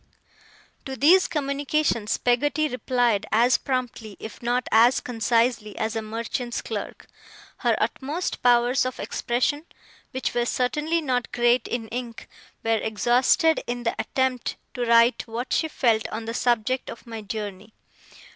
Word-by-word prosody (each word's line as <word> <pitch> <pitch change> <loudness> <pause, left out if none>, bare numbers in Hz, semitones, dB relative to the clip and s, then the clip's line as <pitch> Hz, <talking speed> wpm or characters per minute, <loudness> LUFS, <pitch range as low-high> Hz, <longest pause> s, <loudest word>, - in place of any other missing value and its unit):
To 265 - -5
these 345 +9 +5
communications 280 -5 0
Peggotty 290 +5 +1
replied 245 -4 0
as 235 +4 +4
promptly, 245 -6 -4
if 220 - -9
not 245 +1 0
as 235 +3 +5
concisely, 230 -2 0
as 220 +1 -2
a 225 - -1
merchant's 230 +2 -4
clerk. - - -6 0.5
Her - - +1
utmost 300 +7 -2
powers 245 +2 +4
of 255 0 -4
expression 260 +5 -1 0.5
(which 260 - -3
were 240 0 0
certainly 300 +8 0
not 250 -4 -1
great 240 0 +2
in 235 -2 -3
ink) 235 -1 -6 0.4
were 225 -1 +2
exhausted 245 +9 +2
in 240 0 -3
the 230 - 0
attempt 260 -2 -1 0.2
to 245 -2 -2
write 235 +2 +4
what 235 +3 -4
she 320 - +2
felt 230 -7 +1
on 225 +1 -6
the 230 - -4
subject 245 +1 0
of 230 - -9
my 225 -2 -7
journey. 210 0 -6
240 Hz, 140 wpm, -24 LUFS, 225-260 Hz, 0.5 s, these